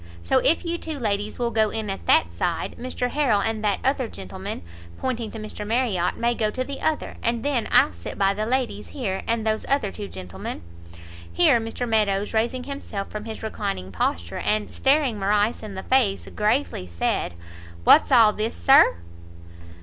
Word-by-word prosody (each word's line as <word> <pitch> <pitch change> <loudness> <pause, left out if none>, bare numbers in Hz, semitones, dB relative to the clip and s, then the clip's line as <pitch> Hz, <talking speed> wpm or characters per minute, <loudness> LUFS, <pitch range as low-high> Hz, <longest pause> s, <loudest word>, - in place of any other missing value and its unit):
So 85 - +3
if 330 +4 +3
you 340 0 -2
two 315 -2 -5
ladies 210 -3 -2
will 240 -1 -1
go 220 -2 +2
in 220 -1 -3
at 195 - -7
that 85 0 +4
side, 165 - -2
Mr 250 0 -3
Harrel 270 -8 +2
and 220 +1 -1
that 205 -2 +2
other 265 -2 +1
gentleman," 95 - -7 0.3
pointing 240 -4 -2
to 225 - -8
Mr 215 -1 -7
Marriot, 215 -5 0
"may 235 0 +1
go 220 -2 0
to 255 +4 -2
the 275 +1 -7
other, 315 -1 -1
and 235 +1 -1
then 275 -5 0
I'll - - +5
sit 85 0 -8
by 195 0 +3
the 215 +2 -2
ladies 255 0 -1
here, 200 -9 -3
and 230 -1 0
those 220 0 0
other 270 -8 +1
two 205 0 -7
gentlemen 90 - -7 0.4
" - - -15 0.3
Here 160 - +5
Mr 225 +2 -4
Meadows, 210 -2 +1
raising 235 +3 0
himself 255 -7 -6
from 210 0 -6
his 220 -1 -7
reclining 200 - -4
posture, 85 -1 -2
and 215 0 -1
staring 270 -5 +2
Morrice 205 +3 +1
in 210 -3 -7
the 190 - -5
face, 245 -7 +2
gravely 210 - 0
said, 85 0 -1 0.5
"What's 295 - +6
all 225 -4 +7
this, 220 +2 -2
Sir!" 270 - +6
220 Hz, 185 wpm, -24 LUFS, 200-250 Hz, 0.5 s, all